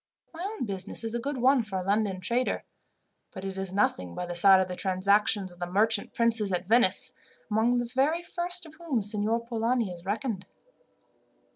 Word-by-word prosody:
My 330 - -8
own 410 - -3
business 195 +1 -4
is 225 0 -4
a 240 - -1
good 275 +3 -3
one 260 +1 +4
for 215 -4 -5
a 185 - -2
London 200 -1 0
trader, 240 +7 0 0.7
but 190 - -8
it 195 -1 -4
is 190 -1 -4
nothing 90 - 0
by 180 - -3
the 175 - -5
side 190 +2 +7
of 190 - +1
the 180 - -5
transactions 195 +1 +2
of 175 - -16
the 175 - -3
merchant 210 +3 +2
princes 225 -3 +1
at 180 0 -2
Venice, 240 +3 +3 0.4
among 225 +3 +2
the 240 - 0
very 275 +8 0
first 350 0 -3
of 315 - -13
whom 285 -11 -1
Signor 215 +3 -1
Polani 230 -2 0
is 170 -1 -12
reckoned." 205 0 -3
215 Hz, 190 wpm, -28 LUFS, 190-245 Hz, 0.7 s, side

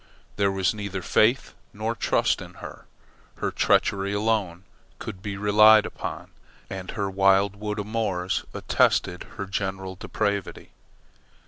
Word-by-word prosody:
There 100 -1 +2
was 95 -2 +1
neither 100 -3 -5
faith 120 +5 +2 0.2
nor 110 +3 -2
trust 115 - +1
in - - -10
her. - - -10 0.5
Her - - -2
treachery 100 0 +1
alone 100 -4 0 0.3
could 95 - -8
be 100 -1 -5
relied 105 +1 +6
upon, - - -6 0.4
and 95 -1 -6
her 100 - -2
wild 95 +1 +3
wood 105 +1 -4
amours 100 -4 -2
attested 90 0 +1
her 100 - -3
general 95 -1 -3
depravity. 100 +1 -3
100 Hz, 125 wpm, -25 LUFS, 95-105 Hz, 0.5 s, relied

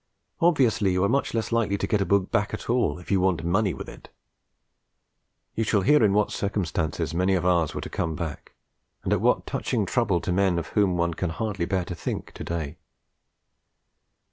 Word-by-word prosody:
Obviously 130 - +3
you 90 +1 +1
are - - +4
much 140 -3 0
less 115 0 -1
likely 110 -4 +1
to - - -1
get 105 -2 +1
a - - 0
book 100 -1 +2
back 110 -2 0
at 110 - -4
all 120 -12 +1
if 90 - -9
you 95 - +4
want 90 -4 +1
more 85 - -1
money 100 +1 +2
with 70 - -7
it. - - -12 1.4
You 115 - 0
shall 105 -2 +2
hear 150 +7 +4
in 105 - +4
what 105 +1 +2
circumstances 85 -5 -2
many 95 +3 +2
of 90 -1 -1
ours 85 -4 +2
were - - -3
to - - -5
come 80 -1 -2
back, 80 -3 -6 0.5
and - - +1
at - - +1
what - - +2
touching 110 -5 -1
trouble 100 -1 +1
to - - -2
men 95 -1 +2
of 85 - -3
whom 100 -4 +2
one 85 0 +1
can 90 +1 -2
hardly 100 0 -2
bear 95 -2 0
to 90 - -5
think 85 - -5
to - - -7
day. 80 -2 -4
95 Hz, 210 wpm, -25 LUFS, 85-105 Hz, 1.4 s, are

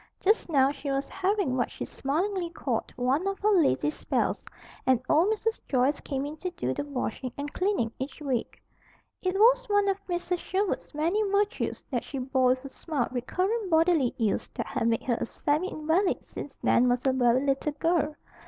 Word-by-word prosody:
Just 425 -1 +2
now 275 -3 +4
she 285 0 -6
was 275 0 -1
having 385 -8 0
what 245 -2 0
she - - -6
smilingly 345 +6 -1
called 260 -8 -3
"one 260 +9 +1
of 395 0 -1
her 425 +2 +2
lazy 320 -5 +3
spells," - - -1 0.4
and 260 -2 +3
old 350 +7 +4
Mrs. 445 +1 -1
Joyce 265 +2 +2
came 275 -1 -3
in 300 +2 -6
to 365 - -3
do 130 - -3
the - - -3
washing 260 -3 -4
and 290 0 -5
cleaning 365 - 0
each 265 +3 -5
week. 265 -6 -2 0.6
It 370 0 -1
was - - +5
one 410 -1 +3
of 395 0 0
Mrs. 350 0 -1
Sherwood's 380 -4 -2
many 335 +8 +1
virtues 410 +3 0
that 245 -3 -1
she 280 - -6
bore 260 0 +1
with 255 +2 +1
a - - -6
smile 285 -4 -2
recurrent 370 - -1
bodily 320 -5 +3
ills 220 -4 0
that - - -2
had 235 -3 -1
made 230 -1 +1
her 240 -3 0
a - - +1
semi 300 +10 0
invalid 320 +5 0
since 280 - -8
Nan 250 +1 +4
was 245 +1 0
a 265 - +3
very 255 +1 +3
little 275 +2 0
girl. 310 0 +1
300 Hz, 190 wpm, -28 LUFS, 260-370 Hz, 0.6 s, was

